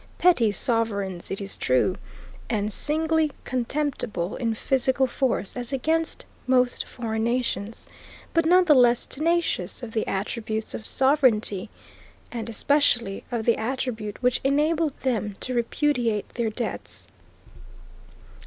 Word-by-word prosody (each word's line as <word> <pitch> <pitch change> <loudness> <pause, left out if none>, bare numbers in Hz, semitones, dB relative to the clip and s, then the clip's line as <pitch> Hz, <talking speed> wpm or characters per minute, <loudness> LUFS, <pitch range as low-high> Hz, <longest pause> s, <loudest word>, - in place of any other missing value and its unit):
Petty 255 -12 +4
sovereigns 200 -4 -1
it 195 - -3
is 200 -1 -2
true, 130 +9 +2 0.5
and 210 -2 -1
singly 315 +2 0
contemptible 245 - -2
in 230 -2 -1
physical 265 +2 +2
force 250 -6 -1
as 245 0 -4
against 320 +5 -1 0.2
most 250 -1 +2
foreign 220 -2 -3
nations, 230 -3 -2 0.5
but 330 - +3
none 365 +2 +6
the 310 - +6
less 245 -3 +4
tenacious 335 -2 -1
of 230 - -6
the 220 -1 -1
attributes 215 +2 -3
of 220 - -5
sovereignty, 245 -8 +3 0.6
and 235 -1 -5
especially 240 -4 +2
of 230 -2 -2
the 235 - +3
attribute 220 -3 -3
which 250 0 +2
enabled 300 +2 +1
them 215 -6 -1
to 255 - -3
repudiate 235 -3 0
their 235 -2 -2
debts. 235 +3 -4
240 Hz, 125 wpm, -25 LUFS, 220-275 Hz, 0.6 s, none